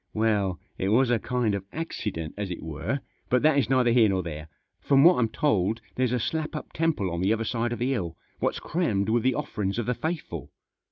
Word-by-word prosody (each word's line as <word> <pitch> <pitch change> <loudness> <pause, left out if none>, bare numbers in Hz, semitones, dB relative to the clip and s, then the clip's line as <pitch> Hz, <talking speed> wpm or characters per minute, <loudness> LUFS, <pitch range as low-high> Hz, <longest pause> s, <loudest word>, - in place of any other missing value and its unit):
" - - -47
Well, 100 -5 +1 0.2
it 95 - 0
was 120 +3 +4
a 120 - +3
kind 120 -3 0
of 100 -1 -2
accident, 105 - -4
as 100 -2 -4
it 90 - -5
were; 80 - -3 0.3
but 125 +2 +3
that 155 -2 +5
is 125 - 0
neither 130 -2 +4
here 115 -3 +5
nor 95 -1 0
there. 75 -2 -6 0.3
From 140 -1 +4
what 175 -4 +7
I'm 115 -2 +2
told 110 -4 +1 0.2
there's 130 -2 +1
a 125 - +2
slap 155 +6 -2
up 150 - -7
temple 160 - 0
on 85 +1 -2
the 95 +3 +2
other 115 0 0
side 120 +1 -1
of 120 - -2
the 125 +3 0
hill, 85 -10 -2 0.2
what's - - 0
crammed 110 - 0
with 115 +1 +3
the 130 +1 +2
offerings 100 -2 -2
of 120 - -1
the 125 - +1
faithful. 160 +5 -4
115 Hz, 230 wpm, -27 LUFS, 95-130 Hz, 0.3 s, what